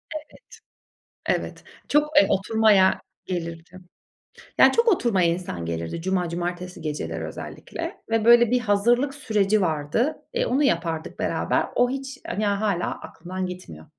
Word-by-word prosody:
Evet. 305 Hz, -, -5 dB, 1.1 s
Evet. -, -, -9 dB, 0.3 s
Çok, 300 Hz, +1 st, +2 dB
eee, -, -, +8 dB
oturmaya 200 Hz, -1 st, +3 dB, 0.2 s
gelirdi 170 Hz, 0 st, -5 dB, 0.8 s
yani -, -, +7 dB
çok 465 Hz, +1 st, +2 dB
oturmaya 230 Hz, -, +3 dB
insan 170 Hz, -, -3 dB
gelirdi 85 Hz, -, -4 dB
cuma, 180 Hz, -1 st, 0 dB
cumartesi 175 Hz, +1 st, -4 dB
geceleri 80 Hz, -, -4 dB
özellikle -, -, -7 dB
ve 225 Hz, -1 st, +1 dB
böyle 240 Hz, 0 st, +7 dB
bir 250 Hz, -, +3 dB
hazırlık 240 Hz, +5 st, +2 dB
süreci 215 Hz, -6 st, +1 dB
vardı. 160 Hz, -, 0 dB
Eee, -, -, +1 dB
Onu 280 Hz, -, +1 dB
yapardık 165 Hz, -, -1 dB
beraber. -, -, 0 dB
O 245 Hz, 0 st, +3 dB
hiç 270 Hz, 0 st, -5 dB
a -, -, -3 dB
ya, 205 Hz, 0 st, 0 dB
hâlâ 200 Hz, -5 st, 0 dB
aklımdan 185 Hz, +2 st, -6 dB
gitmiyor. 180 Hz, -, -9 dB
190 Hz, 135 wpm, -24 LUFS, 170-240 Hz, 1.1 s, eee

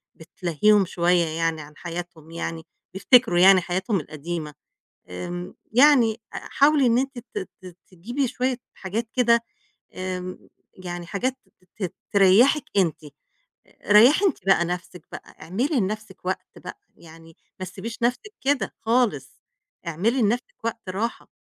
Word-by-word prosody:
بتلهّيهم 180 Hz, +5 st, +1 dB
شوية 175 Hz, 0 st, +2 dB
يعني 165 Hz, 0 st, -2 dB
عن 150 Hz, +1 st, -13 dB
حياتهم 170 Hz, -2 st, -8 dB
يعني 165 Hz, -1 st, -5 dB, 0.3 s
بيفتكروا 195 Hz, -2 st, +4 dB
يعني 190 Hz, +1 st, +7 dB
حياتهم 185 Hz, +3 st, -1 dB
القديمة. 155 Hz, +1 st, -6 dB, 0.6 s
آمم 175 Hz, -, -6 dB, 0.2 s
يعني 250 Hz, -2 st, +5 dB, 0.2 s
آآ -, -, -5 dB
حاولي 285 Hz, -1 st, +3 dB
إن 235 Hz, -1 st, +3 dB
أنتِ 270 Hz, 0 st, -2 dB, 0.2 s
ت 415 Hz, -3 st, -5 dB
ت 180 Hz, -2 st, -12 dB
تجيبي 240 Hz, +10 st, -3 dB
شوية 255 Hz, +1 st, -1 dB, 0.2 s
حاجات 220 Hz, +4 st, -4 dB
كده 235 Hz, -2 st, +3 dB, 0.5 s
آمم 185 Hz, 0 st, -6 dB, 0.2 s
يعني 175 Hz, -1 st, -7 dB
حاجات 250 Hz, +8 st, -2 dB
ت 190 Hz, +2 st, -13 dB
ت -, -, +2 dB
ت 175 Hz, -, -7 dB, 0.2 s
تريَّحك 210 Hz, +9 st, +5 dB
أنتِ. 170 Hz, -5 st, +1 dB, 0.6 s
آآ -, -, -9 dB
ريّحي 250 Hz, -, +7 dB
أنتِ 380 Hz, -, +2 dB
بقى 180 Hz, -3 st, +4 dB
نَفْسِك 180 Hz, +1 st, -6 dB
بقى، -, -, -11 dB
اعملي 240 Hz, -, -1 dB
لنَفْسِك 210 Hz, -2 st, -4 dB
وقت 185 Hz, -, -3 dB
بقى، -, -, -9 dB, 0.2 s
يعني 165 Hz, 0 st, -16 dB, 0.2 s
ما 185 Hz, -, -4 dB
تسيبيش 220 Hz, +5 st, -8 dB
نَفْسِك 250 Hz, -, -1 dB
كده 280 Hz, 0 st, 0 dB
خالص، 225 Hz, -, 0 dB, 0.5 s
اعملي 210 Hz, +11 st, 0 dB
لنَفْسِك 235 Hz, +3 st, 0 dB
وقت 225 Hz, -3 st, -4 dB
راحة. 215 Hz, +6 st, -3 dB
190 Hz, 140 wpm, -24 LUFS, 175-235 Hz, 0.6 s, يعني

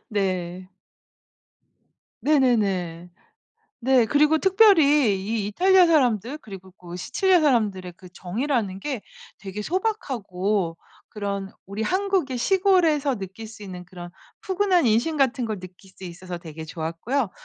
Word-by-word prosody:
네. 185 Hz, -4 st, -2 dB, 1.5 s
네네네. 200 Hz, -, +1 dB, 0.7 s
네. 255 Hz, -1 st, +4 dB
그리고 300 Hz, +4 st, +3 dB
특별히 315 Hz, -, +5 dB
이 215 Hz, -1 st, -2 dB
이탈리아 365 Hz, -, +4 dB
사람들 255 Hz, -, +1 dB
그리고 190 Hz, -7 st, -12 dB
그 175 Hz, -1 st, -10 dB
시칠리아 370 Hz, -, +2 dB
사람들의 210 Hz, -, +1 dB
그 185 Hz, -, -14 dB
정이라는 205 Hz, +1 st, -2 dB
게 260 Hz, -3 st, -4 dB, 0.4 s
되게 200 Hz, +1 st, -6 dB
소박하고 210 Hz, -, -2 dB, 0.3 s
그런 200 Hz, -2 st, -5 dB
우리 200 Hz, +3 st, -5 dB
한국의 375 Hz, -, 0 dB
시골에서 330 Hz, -4 st, +2 dB
느낄 195 Hz, +3 st, -8 dB
수 215 Hz, -1 st, -12 dB
있는 180 Hz, -3 st, -8 dB
그런 175 Hz, -1 st, -10 dB, 0.3 s
푸근한 380 Hz, -5 st, +2 dB
인심 235 Hz, +9 st, +1 dB
같은 265 Hz, -3 st, +1 dB
걸 215 Hz, -4 st, -4 dB
느낄 185 Hz, +1 st, -13 dB
수 190 Hz, -, -11 dB
있어서 175 Hz, 0 st, -7 dB
되게 160 Hz, -2 st, -9 dB
좋았고요. 170 Hz, -, -3 dB
220 Hz, 280 characters per minute, -24 LUFS, 185-295 Hz, 1.5 s, 특별히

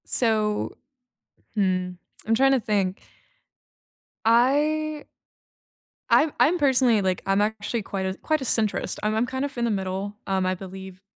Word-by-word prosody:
So 215 Hz, -3 st, 0 dB, 0.8 s
hmm. 185 Hz, -3 st, +1 dB, 0.4 s
I'm 225 Hz, -, +3 dB
trying 270 Hz, +4 st, +4 dB
to 265 Hz, -, +3 dB
think. 200 Hz, -4 st, -1 dB, 1.2 s
I 295 Hz, +6 st, +2 dB, 1.0 s
I'm 305 Hz, -1 st, +4 dB
I'm 345 Hz, +4 st, +4 dB
personally 260 Hz, -7 st, +3 dB
like 185 Hz, -1 st, 0 dB
I'm 195 Hz, +1 st, +2 dB
actually 220 Hz, +2 st, -1 dB
quite 195 Hz, -1 st, -4 dB
a 190 Hz, -, -1 dB
quite 310 Hz, +7 st, -1 dB
a -, -, -3 dB
centrist, 220 Hz, -3 st, -1 dB
and 215 Hz, +1 st, +1 dB
I'm 225 Hz, +2 st, +2 dB
kind 260 Hz, +2 st, -3 dB
of 280 Hz, -2 st, -7 dB
in 240 Hz, -, 0 dB
the 230 Hz, -, 0 dB
middle, 195 Hz, +1 st, -3 dB
um, 190 Hz, -1 st, 0 dB
I 185 Hz, 0 st, 0 dB
believe 190 Hz, 0 st, -10 dB
215 Hz, 150 wpm, -25 LUFS, 190-265 Hz, 1.2 s, trying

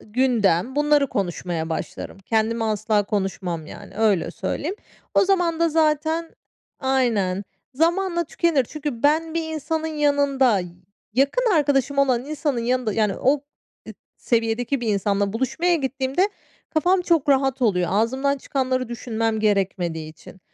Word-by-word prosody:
gündem 230 Hz, -1 st, +1 dB
bunları 295 Hz, -1 st, +3 dB
konuşmaya 175 Hz, -3 st, -3 dB
başlarım. 165 Hz, +4 st, -5 dB
Kendimi 225 Hz, +3 st, 0 dB
asla 215 Hz, -1 st, +1 dB
konuşmam, 190 Hz, -5 st, -3 dB
yani, -, -, -11 dB
öyle 215 Hz, -5 st, +2 dB
söyleyeyim. 310 Hz, -, -3 dB, 0.4 s
O -, -, +5 dB
zaman 355 Hz, -4 st, +1 dB
da 335 Hz, -, +4 dB
zaten 315 Hz, +1 st, +1 dB, 0.5 s
Aynen. 225 Hz, -8 st, +1 dB, 0.3 s
Zamanla 345 Hz, +3 st, +1 dB
tükenir. 310 Hz, -4 st, +1 dB
Çünkü 295 Hz, -6 st, -5 dB
ben 315 Hz, +2 st, +2 dB
bir 335 Hz, -, 0 dB
insanın 315 Hz, +1 st, -2 dB
yanında 285 Hz, -7 st, +2 dB, 0.5 s
yakın 405 Hz, -, +2 dB
arkadaşım 280 Hz, -2 st, +1 dB
olan 255 Hz, -3 st, +2 dB
insanın 290 Hz, -3 st, -2 dB
yanında 245 Hz, -1 st, 0 dB
yani 210 Hz, -2 st, +1 dB
o 270 Hz, +3 st, +3 dB, 0.5 s
ı -, -, -6 dB, 0.2 s
seviyedeki 235 Hz, +3 st, 0 dB
bir 235 Hz, -, -2 dB
insanla 200 Hz, 0 st, 0 dB
buluşmaya 265 Hz, +9 st, +1 dB
gittiğimde 275 Hz, +4 st, 0 dB, 0.4 s
kafam 360 Hz, +4 st, +2 dB
çok 330 Hz, -5 st, +1 dB
rahat 270 Hz, -1 st, +2 dB
oluyor 180 Hz, -6 st, +2 dB
ağzımdan 260 Hz, +7 st, +1 dB
çıkanları 255 Hz, -2 st, -1 dB
düşünmem 225 Hz, -2 st, -2 dB
gerekmediği 185 Hz, -6 st, 0 dB
için. 180 Hz, +4 st, -15 dB
260 Hz, 130 wpm, -23 LUFS, 215-300 Hz, 0.5 s, O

